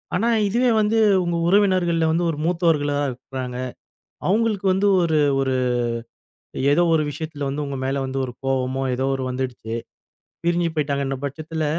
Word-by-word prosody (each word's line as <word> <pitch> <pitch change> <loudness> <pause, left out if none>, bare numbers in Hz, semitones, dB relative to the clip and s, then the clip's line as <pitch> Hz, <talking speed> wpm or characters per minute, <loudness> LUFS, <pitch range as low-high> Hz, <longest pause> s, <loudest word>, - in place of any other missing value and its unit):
ஆனா 215 +6 +1 0.2
இதுவே 245 +4 +2
வந்து 220 +2 +2 0.2
உங்க 170 -1 -1
உறவினர்கள்ல 185 -4 +3
வந்து 165 +2 +1
ஒரு 150 - -6
மூத்தவர்களா 165 -5 +1
இருக்கறாங்க. 125 0 -6 0.7
அவுங்களுக்கு 210 0 +1
வந்து 190 +2 +1 0.2
ஒரு 160 -2 +2 0.2
ஒரு 130 -1 0 1.2
ஏதோ 175 - +4
ஒரு 155 - +3
விஷயத்துல 150 -1 -5
வந்து 145 +2 -2
உங்க 140 -1 -4
மேல 135 +1 -1
வந்து 130 +1 -3
ஒரு 125 - -6
கோவமோ, 135 0 0
ஏதோ 130 +1 -2
ஒரு 130 - -4
வந்துடுச்சு. 125 -3 -4 0.7
பிரிஞ்சி 170 0 +2
போய்ட்டாங்கன்ற 140 -2 -1
பட்சத்தில 155 +3 -3
155 Hz, 145 wpm, -22 LUFS, 135-175 Hz, 1.2 s, ஏதோ